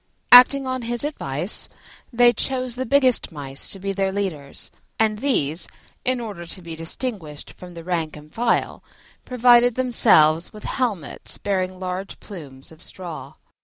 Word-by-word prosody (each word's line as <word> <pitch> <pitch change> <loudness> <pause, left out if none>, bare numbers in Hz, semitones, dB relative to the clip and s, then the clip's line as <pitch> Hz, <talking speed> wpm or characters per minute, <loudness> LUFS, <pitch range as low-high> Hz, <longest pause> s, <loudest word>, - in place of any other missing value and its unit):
Acting 260 +2 +8
on 255 -1 -3
his 240 +1 -3
advice, 180 - +2 0.4
they 240 0 +4
chose 255 +1 -1
the 260 +2 -4
biggest 260 -4 +3
Mice 140 -3 -3
to - - -3
be 195 +1 -4
their 195 0 -1
leaders, 180 -8 -4 0.3
and 215 -1 0
these, 170 - +1 0.4
in 255 0 -1
order 200 -7 -8
to 185 - -6
be 165 -1 -7
distinguished 165 - -5
from 180 -1 -13
the 165 - -9
rank 165 -3 -3
and 150 +1 -16
file, 235 0 -1 0.4
provided 245 -1 +4
themselves 175 -11 +3
with 215 - -13
helmets 215 - -1
bearing 185 -2 -3
large 185 +1 -6
plumes 145 -10 -11
of 160 - -17
straw. 155 -7 -9
195 Hz, 150 wpm, -22 LUFS, 165-245 Hz, 0.4 s, Acting